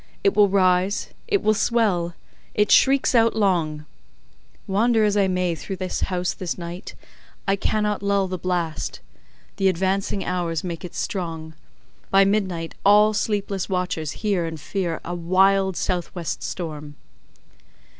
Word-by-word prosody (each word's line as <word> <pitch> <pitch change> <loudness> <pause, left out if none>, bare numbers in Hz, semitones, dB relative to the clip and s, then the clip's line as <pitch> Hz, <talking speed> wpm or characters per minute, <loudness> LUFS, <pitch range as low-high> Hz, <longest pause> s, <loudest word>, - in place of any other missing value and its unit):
It 195 0 +3
will 205 -1 +5
rise—it 190 - +1
will 215 - +4
swell—it 210 -2 -1
shrieks 270 0 +4
out 230 -2 +4
long: 165 -8 0 0.8
wander 220 +3 +2
as 210 -1 +2
I 200 -2 +3
may 180 -2 0
through 180 +4 -6
the 185 -1 -5
house 180 -1 -1
this 180 -3 -4
night, 175 +1 -7 0.5
I 195 - +3
cannot 210 +1 -1
lull 200 -1 +1
the 185 -1 -4
blast. 175 -3 -2 0.6
The 195 - +2
advancing 190 +1 0
hours 170 -3 -2
make 170 -2 -5
it 180 - -8
strong: 165 -4 -4 0.6
by 195 0 +5
midnight, 190 -5 -1
all 210 +2 +6
sleepless 205 -3 -2
watchers 180 -5 -2
hear 190 -5 +1
and 160 -1 -6
fear 175 -1 -3
a 175 - -4
wild 190 +2 +2
south 180 -1 -2
west 170 -4 -4
storm. 150 -4 -6
185 Hz, 135 wpm, -23 LUFS, 175-200 Hz, 0.8 s, all